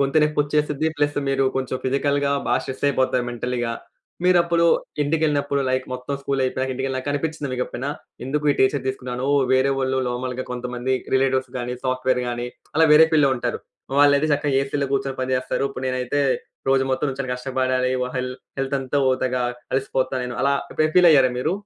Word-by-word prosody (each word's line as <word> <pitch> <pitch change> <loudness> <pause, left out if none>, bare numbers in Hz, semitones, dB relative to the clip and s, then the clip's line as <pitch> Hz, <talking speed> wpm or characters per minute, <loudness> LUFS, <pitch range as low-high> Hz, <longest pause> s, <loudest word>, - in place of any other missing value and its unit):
గొంతు 140 +3 +3
నొప్పి 150 -1 0
ఒచ్చేసిద్ది 150 +1 0
ప్లస్ 145 0 0
మీరు 135 -1 +2
కొంచెం 130 -1 -2
ఫిజికల్‌గా 140 +1 +1 0.2
బా - - +3
స్ట్రెస్ 130 +1 -5
అయిపోతారు 130 -2 +1
మెంటల్‌గా. 120 -1 -2 0.5
మీరప్పుడు 170 -2 +4 0.4
ఇంటికెళ్ళినప్పుడు 145 -2 +1
లైక్ 130 0 0
మొత్తం 125 +2 -4
స్కూల్ 140 -1 -1
అయిపోయాక 130 +1 -1
ఇంటికెళ్ళినాక 130 +1 -2
అనిపించిందా 150 0 -2
మీకు 125 0 -1
ఎప్పుడైనా? 135 +4 -4 0.3
ఎందుకు 150 +3 -2
ఈ - - -6
టీచర్ 130 0 +2
తీసుకున్నాను, 125 0 -4 0.3
వేరే 130 +1 +3
వాళ్ళు 130 0 0
నార్మల్‌గా 125 +1 -3
కొంతమంది 125 +1 -2 0.2
రిలేటివ్స్ 130 -1 +1
గానీ 125 0 -3
సాఫ్ట్‌వేర్ 130 0 +1
గాని 120 0 -3 0.3
అలా 160 +1 +5
వేరే 160 +1 +8
ఫీల్డ్‌లో 145 -3 +4
ఉంటారు. 120 - -3 0.4
వాళ్ళయితే 145 +1 +5
చక్కగా 140 -1 +1
ఏసీ‌లో 140 +1 -2
గూర్చొని 135 0 -1
పని 130 0 -1
జేస్తారు. 130 +1 -1
ఇప్పుడు 130 -1 -6
నేనైతే 130 +2 -1 0.5
రోజు 135 0 +4
మొత్తం 130 +3 0
నించొని 135 -1 -4
కష్టపడాలి 130 0 0
వా 125 - -1
హెల్ 125 0 -2 0.3
హెల్త్ 135 +1 -1
అంతా 135 +1 -3
వోతదిగా 130 -1 +1 0.3
అలిసిపోతా 135 0 0
నేను 125 -1 -4
అలా 140 +1 +2 0.2
ఎప్పుడైనా 155 0 0
ఫీల్ 180 -1 +8
అయ్యారా 135 -4 +5
మీరు? 155 +7 0
135 Hz, 170 wpm, -22 LUFS, 130-145 Hz, 0.5 s, వేరే